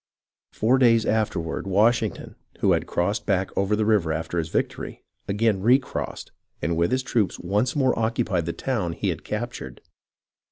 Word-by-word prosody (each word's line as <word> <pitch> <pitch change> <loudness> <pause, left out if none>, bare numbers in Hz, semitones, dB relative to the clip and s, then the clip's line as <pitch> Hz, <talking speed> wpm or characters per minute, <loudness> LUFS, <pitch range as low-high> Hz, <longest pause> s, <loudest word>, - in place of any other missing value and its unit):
Four 125 +4 +2
days 115 -3 +5
afterward 100 -6 -1
Washington, 110 +3 +1 0.3
who - - +4
had - - +1
crossed 90 +5 -1
back 95 -2 0
over 100 +2 +1
the 105 0 0
river 105 -7 +2
after 80 +2 -2
his 80 0 -3
victory, - - -3 0.2
again 105 -1 +1
recrossed, 125 +5 0 0.3
and 85 - -1
with 85 +6 +1
his 130 0 +1
troops 115 -6 0
once 105 +7 0
more 130 -3 +2
occupied 110 -6 0
the - - 0
town 105 -11 -2
he - - -2
had - - -4
captured. 65 -2 -5
105 Hz, 160 wpm, -24 LUFS, 85-115 Hz, 0.3 s, days